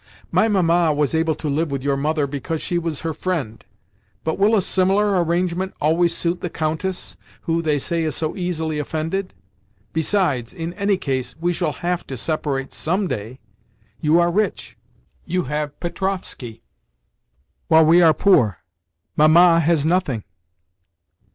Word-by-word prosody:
"My 220 - +3
Mamma 175 -5 +3
was 150 -1 0
able 160 -1 +1
to 155 - -5
live 150 +3 0
with 140 -2 -3
your 140 0 +1
mother 150 +1 0
because 145 +3 -4
she 175 +2 -1
was 165 -4 -4
her 165 -1 -2
friend; 145 -12 -3 0.6
but 160 - -2
will 210 +3 +4
a 205 - +3
similar 195 0 +2
arrangement 175 +2 -1
always 165 +3 +2
suit 175 +1 -1
the 180 - -3
Countess, 160 +4 -3 0.2
who, 165 -1 0
they 155 -3 +1
say, 165 +4 -1
is 155 -3 -2
so 155 -1 -2
easily 160 -4 -2
offended? 160 - -3 0.6
Besides, 160 - 0
in 165 -1 -4
any 200 +1 +1
case, 130 -6 -3
we 175 +2 0
shall 155 - -1
have 180 0 -1
to 135 - -6
separate 135 0 -2
some 185 +5 -1
day. 115 0 -5 0.6
You 155 +2 +3
are 175 0 +3
rich—you 180 - -4
have 150 +1 -4
Petrovskoe, 180 - -4 1.1
while 160 0 +6
we 170 +3 +6
are 160 -2 +6
poor—Mamma 110 - +3
has 160 -2 +2
nothing." 160 - 0
160 Hz, 145 wpm, -21 LUFS, 145-180 Hz, 1.1 s, while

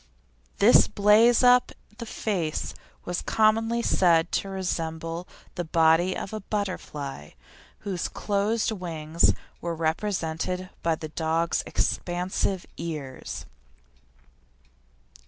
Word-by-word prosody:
This - - +6
blaze 220 +4 +5
up 250 0 +5 0.3
the 235 - -6
face 180 -9 -2 0.3
was 180 0 -2
commonly 225 +2 +2
said 170 -4 +3
to 195 - -1
resemble 165 -2 -3 0.3
the 175 - -3
body 165 +2 +3
of 195 - -6
a 215 - -3
butterfly, 150 - -5 0.5
whose 190 -4 -2
closed 210 +3 0
wings 165 -5 +1 0.3
were 170 -1 -3
represented 170 +1 -2
by 165 -1 +1
the 155 0 -7
dog's 165 +1 0
expansive 180 +1 -1
ears. 150 -6 -6
180 Hz, 100 wpm, -26 LUFS, 160-205 Hz, 0.5 s, This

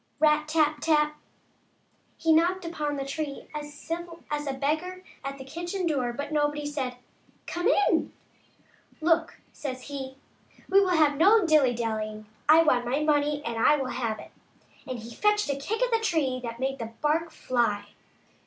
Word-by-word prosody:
Rap! 305 0 +4
tap! 305 -1 +2
tap! 300 -1 +3 1.0
He 325 -1 +3
knocked 350 +3 +2
upon 300 -3 -2
the 275 -1 -3
tree 280 0 -5
as 295 -1 -5
civil 335 +3 -6
as 295 0 -2
a 275 - -1
beggar 315 +7 -2 0.2
at 275 0 -5
the 265 - -8
kitchen 345 +6 -4
door, 270 -7 0
but 285 +5 -5
nobody 295 -1 0
said, 270 -4 -3 0.3
" - - -34
Come 350 +3 -1
in 410 -4 +3 0.3
!" - - -34
" - - -32
Look," 330 0 +2 0.2
says 260 -3 -5
he, 270 -2 -6 0.3
" - - -27
we 395 +1 +7
will 365 -3 +2
have 295 -2 +4
no 400 +5 +6
dilly 295 -7 +4
dallying; 215 -2 -3 0.2
I 320 +2 +8
want 250 -6 +3
my 270 +5 0
money 295 -1 +1
and 230 -1 -3
I 300 - +6
will 265 -3 -3
have 230 -3 -2
it," - - -12 0.6
and 255 -1 -4
he 230 +1 -9
fetched 420 - +2
a - - -1
kick 415 - -2
at - - +1
the 455 - +3
tree 315 -12 0
that 235 -1 -5
made 270 0 -2
the 225 -1 -6
bark 320 +3 +2
fly. 235 -8 -1
295 Hz, 185 wpm, -27 LUFS, 265-330 Hz, 1.0 s, I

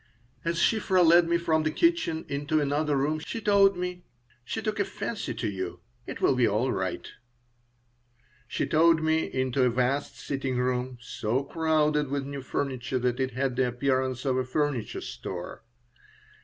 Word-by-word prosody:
As 170 0 -1
Shiphrah 190 -3 +3
led 170 +1 +6
me 170 - +3
from 160 -2 +1
the 155 - 0
kitchen 325 - +1
into 145 +2 0
another 145 0 +1
room 150 +3 0
she 160 - -6
said: 195 -4 +2 0.4
"She 220 - -4
took 215 -1 -2
a - - +4
fancy 200 - -4
to 115 0 -2
you. 95 -3 -4 0.3
It - - -6
will - - +4
be 125 -2 +3
all 115 +6 +1
right." 95 -4 -3 1.4
She - - -1
towed 160 0 +4
me 160 0 +1
into 130 0 0
a 125 - +4
vast 130 +4 -1
sitting 135 -2 -3
room, 125 0 -1
so 120 +2 -2
crowded 150 -1 +1
with 140 0 -2
new 140 0 -5
furniture 130 -1 -2
that 125 0 0
it 130 -1 -1
had 130 -1 0
the 130 0 +2
appearance 130 +1 -1
of 130 -1 +1
a 130 - +1
furniture 135 -2 -2
store. 90 +2 -7
140 Hz, 165 wpm, -27 LUFS, 125-160 Hz, 1.4 s, led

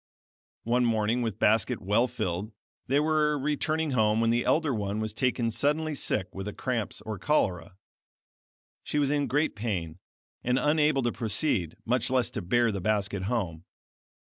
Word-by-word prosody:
One 120 +2 +2
morning 115 +1 +1
with 110 -4 -2
basket 110 -1 +2
well 105 +6 +2
filled, 95 +1 -3 0.3
they 140 +3 +3
were 150 -1 +2
returning 150 +2 -1
home 110 -3 +2
when 115 0 +2
the 120 +1 +1
elder 145 +2 +2
one 105 -1 -2
was 110 -1 -3
taken 120 -1 0
suddenly 150 +5 0
sick 95 -9 -1
with 95 +1 -6
cramps 120 -5 -2
or 110 -3 -6
cholera. 95 - 0 1.1
She - - -3
was 145 -1 +2
in 145 -1 +1
great 145 +3 0
pain, 95 -7 -3 0.4
and 125 +1 +1
unable 150 -1 +2
to 120 - +1
proceed, 105 - 0
much 125 +1 +1
less 130 -2 +1
to - - -4
bear 120 +6 +2
the 100 -2 -4
basket 100 -1 0
home. 95 -8 -2
115 Hz, 160 wpm, -28 LUFS, 105-140 Hz, 1.1 s, they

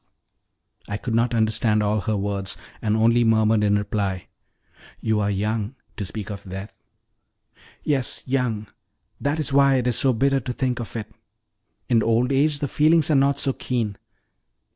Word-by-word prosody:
I 100 - -3
could 115 - -4
not 115 +1 +1
understand 110 -1 +2
all 105 0 +1
her 110 +1 -1
words, 100 -1 -3 0.2
and 110 0 +1
only 115 +2 +4
murmured 110 -1 +3
in 105 0 +3
reply: 100 -3 -2 0.7
"You 110 -1 0
are 100 -1 0
young 105 +4 -2 0.2
to 105 - -4
speak 105 +2 -6
of 100 -1 -7
death." 95 +2 -8 1.1
"Yes, 135 -4 0
young; 125 -5 -1 0.5
that 145 +2 -1
is 145 -3 -1
why 140 -1 +5
it 125 -2 0
is 125 -3 +2
so 135 - +3
bitter 135 +3 +2
to 125 0 -5
think 125 -1 -1
of. 115 0 -6 0.9
In 115 -3 +3
old 115 +4 +2
age 145 +2 +3
the 145 - -2
feelings 155 +2 +3
are - - +4
not 140 +1 +3
so 135 -1 +1
keen." 115 -7 -2
115 Hz, 165 wpm, -23 LUFS, 105-135 Hz, 1.1 s, why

